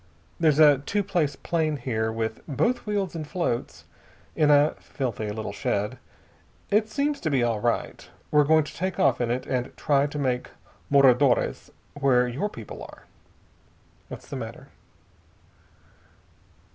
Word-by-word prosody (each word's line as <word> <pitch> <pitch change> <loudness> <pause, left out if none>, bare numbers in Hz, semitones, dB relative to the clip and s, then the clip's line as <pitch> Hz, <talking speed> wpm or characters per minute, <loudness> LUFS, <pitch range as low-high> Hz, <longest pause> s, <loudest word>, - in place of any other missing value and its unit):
There's 155 -4 +3
a 150 -3 +7
two 205 +9 -1
place 170 -8 0
plane 155 0 -1
here 110 -4 -2
with 110 0 -3
both 160 - 0
wheels 200 -4 -1
and 155 -2 -5
floats, 160 -9 -3 0.5
in 150 -1 +3
a 145 +1 +5
filthy 115 -6 -4
little 105 -1 -5
shed. 105 +4 -2 0.7
It 215 +2 +2
seems 285 +4 -1
to 160 - -2
be 135 -4 +2
all 115 -3 0
right. 120 +2 -2 0.2
We're 150 -1 +5
going 155 +1 +4
to - - -10
take 185 +2 -3
off 190 - +3
in 120 - 0
it 125 +2 -2
and 125 0 -3
try 140 -1 +2
to 150 - -7
make 125 -3 -1 0.4
Moradores, 135 -2 +3 0.2
where 130 -3 +3
your 140 +13 -2
people - - -9
are. - - -11 1.0
What's - - -10
the - - -6
matter?" - - -8
145 Hz, 145 wpm, -25 LUFS, 125-160 Hz, 1.0 s, a